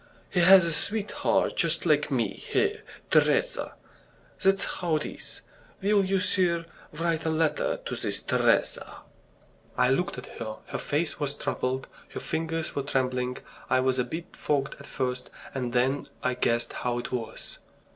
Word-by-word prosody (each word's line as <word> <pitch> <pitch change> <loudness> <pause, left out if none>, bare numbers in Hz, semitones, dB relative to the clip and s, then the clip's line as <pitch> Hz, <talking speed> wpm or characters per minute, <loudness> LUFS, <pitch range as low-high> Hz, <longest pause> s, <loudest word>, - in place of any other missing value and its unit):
He 185 - +2
has 185 +1 +8
a 165 - +1
sweetheart 210 +6 +1
just - - +2
like - - +3
me - - +1
here, 435 0 0 0.3
Teresa. - - +2 0.7
That's 195 0 +4
how 170 -3 -1
it 155 - 0
is. - - -8 0.4
Will 200 +1 +3
you, 190 0 +1
sir, 175 -3 +2 0.3
write 165 +1 -1
a 160 - 0
letter 160 0 +1
to - - -3
this - - -2
Teresa?" - - +1 0.8
I 125 0 +4
looked 175 +1 0
at 125 - -9
her 110 -2 -4
her - - -4
face 150 +2 -1
was 145 -1 -1
troubled, 130 -1 -2 0.3
her - - -2
fingers 160 0 -2
were 140 - +1
trembling. 130 -2 0 0.3
I 130 - +4
was 130 0 +1
a - - +3
bit 160 +8 -7
fogged 140 -2 0
at - - -11
first 125 -2 -3 0.2
and 125 -3 -2
then 130 +3 +1 0.2
I 130 - +2
guessed 120 -1 0
how 120 -1 -1
it 120 - -4
was. 120 -3 -4
150 Hz, 160 wpm, -28 LUFS, 125-175 Hz, 0.8 s, has